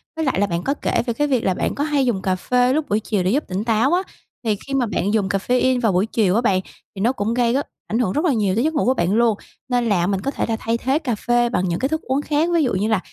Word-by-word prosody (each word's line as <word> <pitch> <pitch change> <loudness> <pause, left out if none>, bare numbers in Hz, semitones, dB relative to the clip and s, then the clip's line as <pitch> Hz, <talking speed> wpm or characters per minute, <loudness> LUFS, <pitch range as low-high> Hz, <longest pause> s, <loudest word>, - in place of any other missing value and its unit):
Với 320 0 -2
lại 260 -8 0
là 205 - +2
bạn 170 -1 -2
có 275 - 0
kể - - -1
về 235 - -1
cái 295 +5 0
việc 255 -5 +1
là 190 - +2
bạn - - -2
có 285 - -1
hay 290 -3 +1
dùng 205 -6 0
cà 185 -1 0
phê 250 +6 +1
lúc 310 0 -1
buổi 210 +2 +2
chiều 205 -3 -1
để 185 - +1
giúp 285 +5 +1
tỉnh 190 +2 -3
táo 230 +7 +2
á, 360 - +3 0.4
thì 215 -2 +1
khi 275 - -5
mà 260 -3 +2
bạn 205 -1 -1
dùng 210 -3 +1
caffeine 250 +5 +1
vào 225 - +2
buổi 185 +3 +2
chiều 215 -4 +1
á 230 - +3
bạn, 190 -6 +2 0.3
thì 190 - -5
nó 235 +5 +3
cũng 225 -2 -2
gây 240 -1 +2
rất 280 +2 -1 0.2
ảnh 225 - -1
hưởng 215 -7 +1
rất 305 - 0
là 300 - +3
nhiều 205 -4 +1
tới 235 - +1
giấc 315 +2 0
ngủ 290 - 0
của 255 - +3
bạn 180 -4 0
luôn. 225 -2 +3 0.3
Nên 245 -2 +1
là 180 -4 +2
mình 195 -1 -1
có 275 - -2
thể - - -2
là 225 - +1
thay 230 +1 -1
thế 265 +5 0
cà 255 -8 -2
phê 240 +2 +1
bằng 185 -6 0
những 170 - -1
cái 265 - 0
thức 315 +1 -1
uống 265 +2 -1
khác, 300 +3 0
ví 335 -2 +3
dụ 250 - 0
như 200 +3 0
là 220 -4 +2
235 Hz, 325 wpm, -21 LUFS, 200-265 Hz, 0.4 s, á